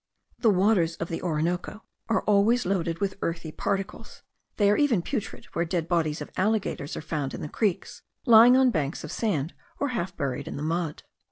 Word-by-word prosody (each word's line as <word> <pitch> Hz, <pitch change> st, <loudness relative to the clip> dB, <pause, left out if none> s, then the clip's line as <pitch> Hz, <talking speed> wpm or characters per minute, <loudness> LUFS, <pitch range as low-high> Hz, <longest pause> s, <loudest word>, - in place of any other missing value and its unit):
The 230 Hz, -, +4 dB
waters 185 Hz, -4 st, +3 dB
of 165 Hz, -, -5 dB
the 165 Hz, -, -4 dB
Orinoco 175 Hz, +5 st, -2 dB, 0.3 s
are 225 Hz, -, +1 dB
always 210 Hz, +4 st, +3 dB
loaded 170 Hz, -3 st, 0 dB
with 195 Hz, -1 st, -2 dB
earthy 165 Hz, -1 st, -3 dB
particles; 195 Hz, +6 st, -4 dB, 0.3 s
they 205 Hz, -2 st, +4 dB
are -, -, +4 dB
even 240 Hz, -, +2 dB
putrid, 235 Hz, -2 st, -4 dB
where 170 Hz, -, +1 dB
dead 170 Hz, -1 st, -2 dB
bodies 160 Hz, -4 st, 0 dB
of 150 Hz, -, -7 dB
alligators 200 Hz, -7 st, -1 dB
are -, -, -4 dB
found 150 Hz, -3 st, -3 dB
in -, -, -7 dB
the -, -, -3 dB
creeks, 200 Hz, +3 st, -2 dB, 0.2 s
lying 240 Hz, +1 st, +8 dB
on 260 Hz, -1 st, +5 dB
banks 150 Hz, -5 st, -2 dB
of -, -, -6 dB
sand, 170 Hz, -9 st, -1 dB, 0.3 s
or 285 Hz, -, 0 dB
half 190 Hz, -6 st, -3 dB
buried 140 Hz, 0 st, -3 dB
in -, -, -5 dB
the 145 Hz, -, -4 dB
mud. 165 Hz, -1 st, -2 dB
180 Hz, 190 wpm, -26 LUFS, 165-215 Hz, 0.3 s, lying